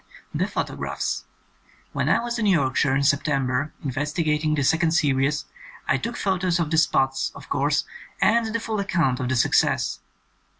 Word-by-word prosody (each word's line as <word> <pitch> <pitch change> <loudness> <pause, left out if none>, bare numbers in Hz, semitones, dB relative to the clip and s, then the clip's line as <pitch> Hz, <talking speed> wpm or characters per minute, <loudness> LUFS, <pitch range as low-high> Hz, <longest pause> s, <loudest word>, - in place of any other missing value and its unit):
"The - - 0
photographs: 90 0 -3 0.7
"When 140 +6 -1
I - - +3
was 235 0 -3
in 215 - +1
Yorkshire 140 -5 +2
in 140 - +1
September 140 -1 +1
investigating 150 +2 0
the 145 - 0
second 160 +3 +2
series, 145 -1 +1 0.4
I - - +3
took 235 +1 -4
pho 190 -2 0
tos 180 -2 +1
of 165 -3 -1
the 160 - +4
spots, 135 -4 +1
of - - -12
course, 145 +1 +1 0.4
and 230 +1 +3
the 225 +1 -2
full 220 -2 -3
ac 200 - -3
count 145 -10 +1
of 130 -1 -2
the 130 - +1
success. 120 - +2
150 Hz, 170 wpm, -24 LUFS, 135-175 Hz, 0.7 s, the